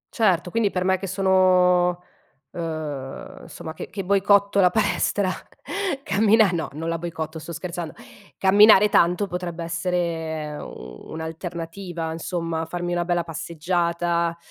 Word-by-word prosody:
Certo, 185 -6 +2
quindi 230 -3 +2
per 180 -2 -2
me 190 0 +2
che 195 - -5
sono 180 -2 +3 0.5
uhm, 155 -5 -5
insomma, 160 - -8
che - - -8
che 195 - -5
boicotto 200 +1 +3
la 180 - +6
palestra, 205 -1 +1 0.8
cammina 210 0 +4
no, 165 -2 -2
non 160 +2 -5
la 165 0 -1
boicotto, 160 -1 -5
sto 170 - -8
scherzando. 170 -1 -5 0.4
Camminare 205 +1 +7
tanto 180 +1 +3
potrebbe 175 -2 -5
essere, 165 -2 -2
ehm, - - -7 0.5
un'alternativa, 165 +1 -5
insomma, 165 0 -3
farmi 175 +1 -3
una 175 0 0
bella 175 -1 +1
passeggiata, 170 +1 -1
175 Hz, 130 wpm, -23 LUFS, 165-190 Hz, 0.8 s, Camminare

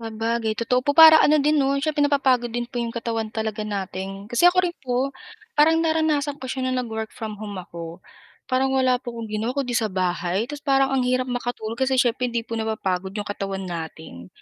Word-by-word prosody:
Sabagay, 225 0 -2
totoo 250 +2 +1
po 285 - +2
para 315 +1 +10
ano 300 0 +4
din, 300 +2 +2
'no? 275 -1 +2
Siyempre 300 -1 +1
napapagod 260 -5 +2
din 240 0 -3
po 245 - -10
'yong 235 -1 -2
katawan 225 -2 -3
talaga 220 -1 -3
natin. 195 0 -5
Kasi 240 +9 +1
ako 355 +1 +6
rin 350 -1 -2
po, 255 +2 0 0.5
parang 320 +2 +5
naranasan 315 -3 +1
ko 265 - -11
siya 255 0 -2
no'ng 255 -1 -1
nag-work 220 -1 -4
from 220 -3 -5
home 205 -2 -6
ako. 170 -1 -8 0.4
Parang 260 +1 +1
wala 255 -1 +2
po 240 -2 -7
akong 230 - -5
ginawa 220 +5 -3
kundi 265 -3 -1
sa 225 -2 +1
bahay, 185 +2 -1
tapos 290 +3 -8
parang 270 -2 +2
ang 270 - +2
hirap 255 0 +1
makatulog 245 -2 -4
kasi 265 0 +2
siyempre 250 0 +1
hindi 235 -1 -2
po 230 -1 -4
napapagod 195 -3 -2
'yong 205 - -3
katawan 195 -1 -4
natin. 160 - -7
240 Hz, 205 wpm, -23 LUFS, 215-270 Hz, 0.5 s, para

